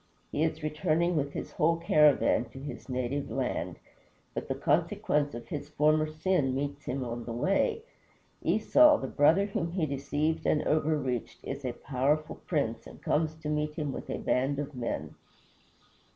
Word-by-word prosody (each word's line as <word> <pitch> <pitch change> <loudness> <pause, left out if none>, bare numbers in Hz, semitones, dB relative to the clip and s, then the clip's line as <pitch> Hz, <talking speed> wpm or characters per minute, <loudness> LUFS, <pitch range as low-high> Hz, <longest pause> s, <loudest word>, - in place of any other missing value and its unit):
He 150 - -1
is 160 -1 -1
returning 155 +3 +1
with 145 -2 -1
his - - -5
whole 165 +2 +2
caravan 150 -6 +4
to 125 +3 -11
his 140 0 -8
native 130 +2 -2
land. - - -2 0.6
But - - -4
the - - -1
consequence 145 -2 +1
of 120 0 -8
his 145 -1 -5
former 155 +1 +3
sin 155 -3 0
meets 140 +1 -3
him 130 0 -2
on 120 0 -4
the 120 - -5
way. 195 - +1 0.6
Esau, 300 +7 +5
the - - -5
brother 160 +7 +4
whom 195 -5 -3
he 180 -4 +1
deceived 145 +3 -1
and 150 - +2
overreached, 145 -6 0
is 140 - -5
a 125 -2 -2
powerful 145 +5 -1
prince, - - -1
and - - -12
comes 155 0 +1
to 160 -1 -8
meet 150 0 -1
him 150 -3 -2
with - - -7
a - - -2
band 135 +2 0
of 145 0 -4
men. 125 -2 -4
150 Hz, 165 wpm, -29 LUFS, 135-160 Hz, 0.6 s, Esau